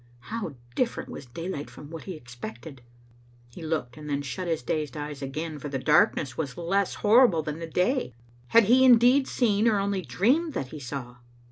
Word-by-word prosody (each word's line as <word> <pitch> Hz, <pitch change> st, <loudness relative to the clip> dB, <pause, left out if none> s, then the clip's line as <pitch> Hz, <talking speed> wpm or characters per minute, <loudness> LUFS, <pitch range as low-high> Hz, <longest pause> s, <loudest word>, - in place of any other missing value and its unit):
How 205 Hz, -11 st, -4 dB, 0.2 s
diflEerent 245 Hz, -2 st, -1 dB
was 135 Hz, -, -8 dB
daylight 155 Hz, +3 st, -5 dB
from 145 Hz, +1 st, -12 dB
what 165 Hz, -1 st, -8 dB
he 190 Hz, -, -5 dB
had 155 Hz, -, -11 dB
expected! 125 Hz, +2 st, -9 dB, 0.7 s
He 145 Hz, -, -11 dB
looked, 155 Hz, -5 st, -3 dB
and 150 Hz, -1 st, -8 dB
then 145 Hz, 0 st, -1 dB
shut 175 Hz, +7 st, -4 dB
his 165 Hz, -6 st, -1 dB
dazed 150 Hz, +2 st, -2 dB
eyes 145 Hz, -1 st, -6 dB
again, 150 Hz, +3 st, -4 dB
for 145 Hz, -, -6 dB
the 135 Hz, -, -2 dB
darkness 140 Hz, -1 st, +3 dB
was 140 Hz, -6 st, -4 dB
less 190 Hz, +3 st, 0 dB
horrible 210 Hz, -7 st, +6 dB
than 150 Hz, +1 st, -5 dB
the 165 Hz, -, -5 dB
day. 180 Hz, -, 0 dB, 0.3 s
Had 230 Hz, -, +6 dB
he 245 Hz, +6 st, +5 dB
indeed 255 Hz, +2 st, +6 dB
seen, 220 Hz, -3 st, +2 dB
or 220 Hz, -2 st, +3 dB
only 200 Hz, -1 st, 0 dB
dreamed 275 Hz, -, +1 dB
that 130 Hz, -, -3 dB
he 155 Hz, -, -8 dB
saw? 125 Hz, -2 st, -6 dB
160 Hz, 195 wpm, -27 LUFS, 140-205 Hz, 0.7 s, horrible